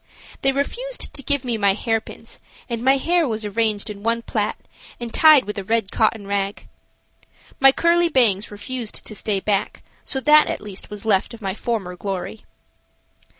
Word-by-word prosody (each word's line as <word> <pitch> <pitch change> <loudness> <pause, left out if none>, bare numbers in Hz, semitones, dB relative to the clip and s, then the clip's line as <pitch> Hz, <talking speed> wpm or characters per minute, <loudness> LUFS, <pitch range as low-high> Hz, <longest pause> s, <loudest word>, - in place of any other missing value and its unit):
They 270 - +3
refused 485 - -2
to 275 - -4
give 280 0 0
me 235 -3 -1
my 200 -1 +4
hairpins, 225 +2 -4 0.3
and 235 -2 -4
my 265 +2 +4
hair 335 +3 +1
was 220 -2 -3
arranged 210 0 -1
in 205 -2 -7
one 230 +2 -1
plait - - -1 0.4
and 235 -1 -6
tied 310 -6 +6
with 210 0 -4
a - - -5
red 220 0 -1
cotton 220 -2 +1
rag. 200 0 -3 0.9
My 270 0 +8
curly 340 +3 +2
bangs 220 - +2
refused 225 +2 -4
to - - -5
stay 205 -1 -2
back, 200 0 -2 0.2
so 265 - -1
that 300 +2 +6
at - - -3
least 205 -2 -8
was 210 0 -8
left 210 +2 +1
of 225 - -16
my 190 -1 -2
former 205 -5 -3
glory. 195 +3 -5
225 Hz, 175 wpm, -21 LUFS, 205-265 Hz, 0.9 s, My